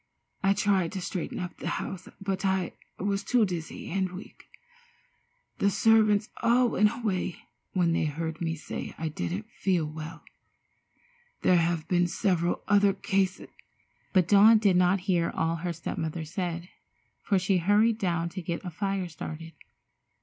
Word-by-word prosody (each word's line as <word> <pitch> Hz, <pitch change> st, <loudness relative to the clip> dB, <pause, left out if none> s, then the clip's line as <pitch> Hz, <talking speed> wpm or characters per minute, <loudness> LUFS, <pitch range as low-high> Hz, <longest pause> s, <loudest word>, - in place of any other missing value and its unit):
I 195 Hz, 0 st, +4 dB
tried 195 Hz, -4 st, +2 dB
to 195 Hz, -, -3 dB
straighten 180 Hz, -1 st, -4 dB
up 180 Hz, -1 st, -5 dB
the -, -, -6 dB
house, 185 Hz, -1 st, -6 dB
but 195 Hz, -1 st, -3 dB
I 190 Hz, -1 st, 0 dB, 0.2 s
was 200 Hz, +1 st, -1 dB
too 240 Hz, -1 st, +3 dB
dizzy 170 Hz, -4 st, -5 dB
and 190 Hz, 0 st, 0 dB
weak. 185 Hz, -, -11 dB, 1.1 s
The 200 Hz, -, +3 dB
servants 215 Hz, 0 st, +3 dB
all 240 Hz, +1 st, +4 dB
went 210 Hz, -1 st, +3 dB
away 195 Hz, -7 st, -2 dB, 0.4 s
when 175 Hz, -3 st, +2 dB
they 165 Hz, -, +1 dB
heard 160 Hz, +2 st, -4 dB
me 165 Hz, -1 st, -1 dB
say 155 Hz, -, -6 dB
I 160 Hz, 0 st, -2 dB
didn't 90 Hz, -, -4 dB
feel 180 Hz, -5 st, 0 dB
well. 155 Hz, +1 st, -8 dB, 1.2 s
There 180 Hz, -, +5 dB
have 165 Hz, -1 st, 0 dB
been 175 Hz, -1 st, +2 dB
several 175 Hz, -1 st, 0 dB
other 205 Hz, -1 st, +4 dB
cases——" 190 Hz, -1 st, -1 dB, 0.6 s
But 185 Hz, -4 st, +3 dB
Dawn 210 Hz, +3 st, +7 dB
did 205 Hz, -4 st, +3 dB
not 180 Hz, +1 st, +3 dB
hear 175 Hz, -3 st, +1 dB
all 165 Hz, +1 st, -1 dB
her 175 Hz, +2 st, -3 dB
step 165 Hz, -1 st, -5 dB
mother 160 Hz, 0 st, -3 dB
said, 175 Hz, +1 st, -4 dB, 0.5 s
for 200 Hz, -, +1 dB
she 185 Hz, 0 st, +2 dB
had 170 Hz, -, -7 dB
hurried 215 Hz, +2 st, +4 dB
down 170 Hz, -4 st, 0 dB
to 185 Hz, +2 st, -6 dB
get 170 Hz, +2 st, -4 dB
a 180 Hz, -, -4 dB
fire 195 Hz, +1 st, -2 dB
started. 165 Hz, 0 st, -8 dB
180 Hz, 160 wpm, -28 LUFS, 165-200 Hz, 1.2 s, Dawn